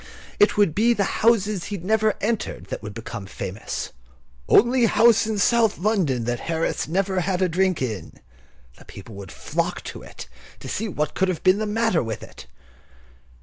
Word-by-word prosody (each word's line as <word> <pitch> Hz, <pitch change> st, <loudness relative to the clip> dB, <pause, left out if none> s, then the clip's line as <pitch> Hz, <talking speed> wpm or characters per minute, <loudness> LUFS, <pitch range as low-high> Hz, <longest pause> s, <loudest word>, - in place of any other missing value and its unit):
It 205 Hz, -, +4 dB
would 200 Hz, -7 st, +4 dB
be 230 Hz, +6 st, +3 dB
the 205 Hz, -, +1 dB, 0.2 s
houses 215 Hz, -3 st, +3 dB
that -, -, -8 dB
he 205 Hz, -, -4 dB
had 180 Hz, -2 st, -8 dB
never 220 Hz, +1 st, +2 dB
entered 225 Hz, 0 st, -2 dB
that -, -, -5 dB
would 105 Hz, -2 st, -8 dB
become 105 Hz, -3 st, -7 dB
famous. 95 Hz, +2 st, -5 dB, 0.6 s
"Only 240 Hz, +1 st, +5 dB
house 220 Hz, 0 st, +4 dB
in 220 Hz, -1 st, -1 dB
South 225 Hz, +1 st, +3 dB
London 175 Hz, -, +1 dB
that 120 Hz, +1 st, -2 dB
Harris 165 Hz, 0 st, -1 dB
never 190 Hz, +3 st, 0 dB
had 180 Hz, 0 st, -1 dB
a 185 Hz, -, +3 dB
drink 180 Hz, -3 st, +1 dB
in!" 105 Hz, -9 st, -5 dB, 0.6 s
The -, -, -16 dB
people 105 Hz, +3 st, -11 dB
would 100 Hz, -3 st, -9 dB
flock -, -, -3 dB
to -, -, -8 dB
it -, -, -10 dB, 0.3 s
to -, -, -9 dB
see 220 Hz, -, -2 dB
what 150 Hz, -6 st, -2 dB
could 190 Hz, -, +1 dB
have 185 Hz, -3 st, -3 dB
been 185 Hz, +2 st, +4 dB
the 215 Hz, -, -1 dB
matter 225 Hz, -4 st, +1 dB
with 115 Hz, -2 st, -5 dB
it. -, -, -12 dB
190 Hz, 190 wpm, -23 LUFS, 150-215 Hz, 0.6 s, Only